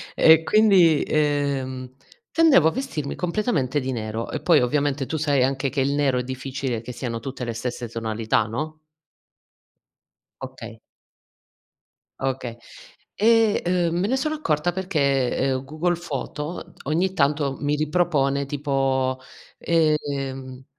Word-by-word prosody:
E 160 0 +6
quindi, 190 -6 +5
ehm, 140 -4 -1 0.4
tendevo 310 - +5
a - - -4
vestirmi 165 - -4
completamente 170 - 0
di 130 +1 -3
nero 110 -1 -4
e 155 - -4
poi 160 -3 +4
ovviamente 140 +2 0
tu 160 - -3
sai 145 -4 +2
anche 135 +1 0
che 135 0 -1
il 140 +1 +1
nero 140 -3 +1
è - - -2
difficile 130 -2 -4
che 125 +2 -8
siano 115 -2 -4
tutte 130 +2 -6
le 120 -1 -3
stesse 120 0 -4
tonalità, 115 0 0
no? 155 +8 -5 1.6
Okay - - -9 1.4
Okay. 130 -3 -3 0.6
E, 225 0 +4 0.3
uhm, 170 +1 -1
me 195 - +1
ne 255 - +1
sono 305 +3 -1
accorta 155 - 0
perché, 145 -9 0
ehm, 130 0 0
Google 155 +5 -1
Foto 150 0 -6
ogni 175 +6 0
tanto 140 -4 +1
mi 145 0 0
ripropone 150 -3 +1
tipo, 135 -2 0 0.4
ehm, 140 -5 -1
140 Hz, 130 wpm, -23 LUFS, 130-160 Hz, 1.6 s, E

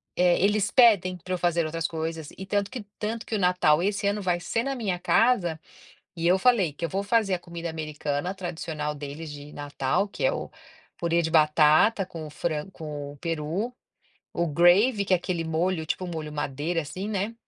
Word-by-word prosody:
eh, 180 -1 +3
eles 205 0 +2
pedem 200 -8 +5
pra 185 +2 -5
eu - - 0
fazer 170 -1 +1
outras 165 +1 -2
coisas, 160 -1 -4
e 190 - -6
tanto 200 +1 0
que 250 -4 -6 0.2
tanto 220 +2 -3
que - - -7
o - - 0
Natal 180 -4 +3
esse 200 +1 -1
ano 205 +1 0
vai 175 -2 0
ser 205 +6 -1
na 275 +1 -2
minha 200 -8 -2
casa, 175 -6 +2 0.6
e 165 0 -1
eu 185 +2 +5
falei 205 -9 +3
que 170 +4 -4
eu - - -4
vou 195 +1 -1
fazer 210 -2 +2
a - - -5
comida 170 -1 -6
americana 155 +1 -3
tradicional 160 -4 -4
deles 145 +2 -7
de 145 0 -10
Natal, 145 +5 -1
que 200 - -7
é - - +4
o - - -4 0.5
purê 170 0 +1
de 160 -1 -2
batata 155 +6 +4
com 165 -4 -8
o - - -10
fran 155 +3 -3
com 150 -4 -7
o 145 - -16
peru, 165 - -3 0.6
o 170 - 0
gravy 185 - +4
que 190 - -1
é - - +5
aquele 170 -2 -3
molho, 160 +1 0
tipo 185 - -2
o - - -5
molho 155 -3 -5
madeira, 150 +4 -2
assim, 185 +7 -6
né, 210 +2 -2
175 Hz, 205 wpm, -26 LUFS, 155-195 Hz, 0.6 s, pedem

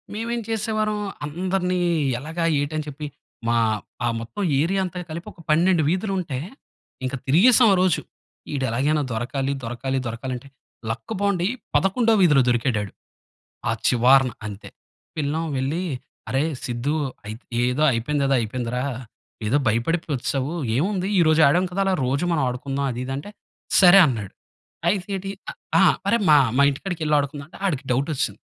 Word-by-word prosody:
మేము 225 +2 -3
ఏం 235 - -2
చేసేవారం, 215 -1 -1 0.3
అందర్నీ 180 +3 -1 0.4
ఎలాగా, 160 +5 -4 0.2
ఏటి, 145 +2 -2
అని 155 - -3
చెప్పి, 150 +1 -6 0.4
మా 120 - +2 0.5
ఆ - - +2
మొత్తం 115 - -6 0.2
ఏరియా 190 +4 +1
అంతా 180 -1 -4
కలిపి, 170 +2 -6
ఒక 170 - -15
12 170 +2 +4
వీధులు 190 +4 -1
ఉంటే, 150 -8 -4 0.7
ఇంకా 130 +1 -2
తిరిగేసాం 220 - +6
ఆ - - +4
రోజు. 185 -3 +2 0.5
ఈడు 135 -2 -1
ఎలాగైనా 145 +6 +1
దొరకాలి, 135 +4 -2
దొరకాలి, 130 +3 -2
దొరకాలి 115 +3 -4
అంటే, 140 - -13 0.4
లక్క్ 120 - -4
బావుండి, 195 -3 +1 0.3
పదకొండో 225 +4 +3
వీధిలో 150 -7 +5
దొరికాడాడు. 115 -4 0 0.8
ఆ - - +3 0.2
చివార్న. 130 +2 +5 0.2
అంతే, 100 -1 -8 0.5
పిల్లం 155 +2 -1
వెళ్లి, 140 +7 -1 0.5
"అరేయ్ 145 +5 +1
సిద్దు, 125 +5 -2 0.3
అయితె 110 +3 -8 0.2
ఏదో 125 +5 +1
అయిపోయింది, 140 +5 0
ఏదో 135 - +3
అయిపోయిందిరా! 120 +2 -3 0.6
ఏదో 115 +7 +2
భయపడిపోయి 150 +9 0
వచ్చేసావు. 135 +4 -2 0.2
ఏముంది, 185 +4 0
ఈరోజు 160 -1 +4
ఆడాం 175 +6 +3
కదా, 195 +2 -1
అలా 190 - +2
రోజూ 135 +6 0
మనం 160 -4 +1
ఆడుకుందాం." 135 +2 -2
అది, 120 - -5
ఇది 135 - -4
అంటే, 145 +9 -7 0.5
"సరే" 185 +1 +9
అన్నాడు. 110 -7 -4 0.5
అయితే 190 +2 +1
ఏటీ, 195 +1 -5 0.2
అ - - -3 0.3
ఆ! - - +6 0.2
"అరేయ్, 230 -3 +2
మా 150 - +8 0.2
మా 140 - +6
ఇంటికాడికెళ్ళి, 155 0 -2
ఆడుకుందాం 140 0 -4
అంటే, - - -14
ఆడికి 140 -7 -2
డౌట్ 135 +5 0
వచ్చేసింది. 135 - -2
150 Hz, 155 wpm, -23 LUFS, 130-180 Hz, 0.8 s, సరే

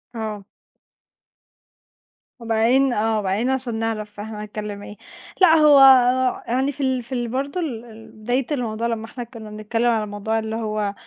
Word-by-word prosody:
آه. 215 -3 -5 1.9
وبعدين 235 +3 +2
آه، 220 0 0
وبعدين 205 +5 -1
عشان 260 -3 -2
نعرِف 215 -2 -4
إحنا 210 0 -6
نتكلم 210 -1 -7
إيه، 210 - -10 0.5
لأ، 335 -3 +7
هو 300 -3 +6 0.7
يعني 260 +4 0
في 285 - -9
ال 260 -2 0
في 235 - -18
ال 240 -1 -2
برضو 275 +8 -3
ال 245 -8 -4
ال 225 -1 -14
بداية 245 +4 -2
الموضوع 235 -4 -2
لمّا 225 -1 -3
إحنا 240 +2 -7
كنا 230 -2 -11
بنتكلم 215 +3 -1
على 220 -2 0
الموضوع 210 +2 -2
اللي 220 0 -4
هو 215 -2 -2
225 Hz, 155 wpm, -22 LUFS, 215-250 Hz, 1.9 s, لأ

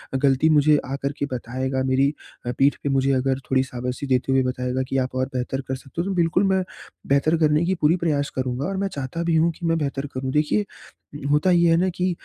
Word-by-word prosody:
ग़लती 135 +3 +3
मुझे 150 0 +4
आकर 140 +1 -3
के - - 0
बताएगा, 130 +2 -2
मेरी 135 +2 +2 0.3
अ, 120 - -1
पीठ 140 +1 +4
पे 140 - 0
मुझे 135 0 +2
अगर 130 0 0
थोड़ी 130 0 +3
शाबाशी 125 +1 -5
देते 130 0 +1
हुए 135 -1 +3
बताएगा 125 0 -2
कि 135 - 0
आप 130 0 -1
और 130 0 +1
बेहतर 130 +2 -2
कर 130 - -2
सकते 135 +5 -6
हो 180 - -3
तो 195 - -1
बिल्कुल 175 +2 +2
मैं, 190 -1 +2 0.4
बेहतर 140 +4 +3
करने 155 +1 +2
की 190 +2 +1
पूरी 150 +3 +4
प्रयास 150 -5 0
करूँगा 130 +1 -2
और 195 - -3
मैं 195 +1 0
चाहता 145 +1 -4
भी 170 -1 +1
हूँ 165 +1 +3
कि 170 +1 -8
मैं 165 0 +2
बेहतर 140 -2 -2
करूँ। 130 0 -3
देखिए 155 +8 +1 0.7
होता 150 +5 +3
ये 170 -1 +4
है 165 - +5
ना 185 +2 +2
कि 180 0 0
140 Hz, 230 wpm, -23 LUFS, 130-165 Hz, 0.7 s, है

